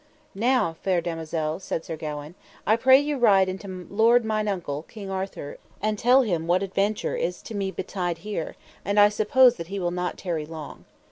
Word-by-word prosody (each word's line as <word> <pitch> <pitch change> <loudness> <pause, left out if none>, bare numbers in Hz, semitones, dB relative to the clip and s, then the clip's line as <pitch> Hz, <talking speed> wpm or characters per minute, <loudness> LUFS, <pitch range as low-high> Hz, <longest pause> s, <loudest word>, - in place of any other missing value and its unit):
Now, 220 -6 +1
fair 185 -2 +1
damosel, 165 -1 -3
said 165 -3 -4
Sir 160 - -4
Gawaine, 150 0 -6 0.3
I 220 - +4
pray 260 +3 +6
you 290 -1 -2
ride 195 -5 +5
unto 190 +2 -5
my 185 -2 -7
lord 230 +3 +4
mine 215 -1 0
uncle, 170 -8 -3
King 200 -4 -8
Arthur, 190 -6 -5 0.2
and 215 -1 -1
tell 255 +3 +5
him 170 -7 -1
what 180 +2 +2
adventure 195 +2 -1
is 180 +2 -2
to - - -8
me 195 -2 -2
betid 175 -3 -3
here, 195 -2 -5 0.3
and 200 +1 +1
I 205 0 +8
suppose 240 +4 +4
he 185 +4 -5
will 175 -1 -1
not 180 0 -3
tarry 165 -5 -3
long. 155 -2 -9
190 Hz, 190 wpm, -25 LUFS, 170-215 Hz, 0.3 s, I